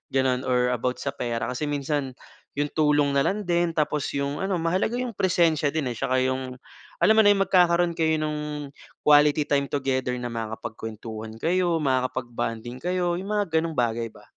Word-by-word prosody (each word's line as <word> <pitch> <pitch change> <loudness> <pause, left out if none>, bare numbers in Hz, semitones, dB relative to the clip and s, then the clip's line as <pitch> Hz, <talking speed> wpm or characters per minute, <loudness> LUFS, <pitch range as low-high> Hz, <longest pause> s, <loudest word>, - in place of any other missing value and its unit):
gano’n 130 -1 +1
or 125 0 +2
about 125 +1 -1
sa - - -2
pera 120 -1 -3
kasi 130 +4 -3
minsan 145 -2 -2 0.4
‘yong 145 +1 -1
tulong 145 -2 +3
na 140 - +3
lang 210 +2 0
din. 175 -1 +1
Tapos 150 -2 0
‘yong 140 +1 -2
ano, 195 -1 0
mahalaga 185 +7 0
‘yong 250 -1 -2
presensiya 170 -5 +2
din, 150 -5 0
eh, - - -6
tsaka 130 -1 +1
‘yong 130 0 -2 0.5
alam 220 - +6
mo - - +9
na, 205 - +8
yung 195 - +2
magkakaroon 175 -2 +3
kayo 160 0 +3
nung 150 -1 -4 0.3
quality 150 0 +5
time 140 -1 +2
together 130 -3 -1
na 125 -1 -5
makakapagkwentuhan 110 -1 -6
kayo, 175 0 +2
makakapag 130 -3 -1
bonding 115 +1 -4
kayo, 175 +1 -1
yung 190 - -7
mga 200 -7 +1
gano'ng 165 -1 -3
bagay 115 -2 0
ba. 105 -2 -16
145 Hz, 180 wpm, -25 LUFS, 125-170 Hz, 0.5 s, mo